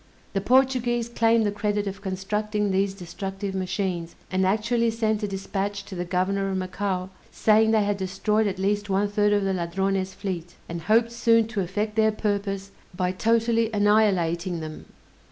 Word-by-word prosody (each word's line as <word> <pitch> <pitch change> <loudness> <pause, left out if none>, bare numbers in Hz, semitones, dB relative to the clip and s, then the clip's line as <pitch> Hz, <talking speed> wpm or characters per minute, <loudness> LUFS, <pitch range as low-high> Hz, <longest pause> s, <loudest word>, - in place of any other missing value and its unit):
The 195 - 0
Portuguese 250 0 +2
claim 230 -1 +3
the 205 - +1
credit 205 0 -1
of 200 0 -5
constructing 210 +2 -1
these 195 +1 +1
destructive 195 +2 -5
machines, 185 -2 -2 0.2
and 185 0 +2
actually 230 +4 +1
sent 220 -1 0
a 210 - -1
dispatch 200 +1 -3
to - - -10
the 175 -1 -3
Governor 195 +2 0
of 190 - -1
Macao, 185 0 -2 0.2
saying 220 0 +3
they 220 -1 +3
had 205 0 0
destroyed 205 +3 0
at 195 -1 -2
least 205 +2 0
one 195 +2 +2
third 205 0 +2
of 205 -1 +2
the 195 0 0
Ladrones' 190 +2 -1
fleet, 180 -4 -5
and 170 0 -5
hoped 225 +6 +3
soon 230 -1 +3
to 215 -3 -1
effect 210 +4 -2
their 220 0 +4
purpose 200 -2 -2 0.2
by 180 0 0
totally 230 +3 +2
annihilating 190 -5 +2
them! 155 -1 -7
200 Hz, 170 wpm, -25 LUFS, 190-215 Hz, 0.2 s, their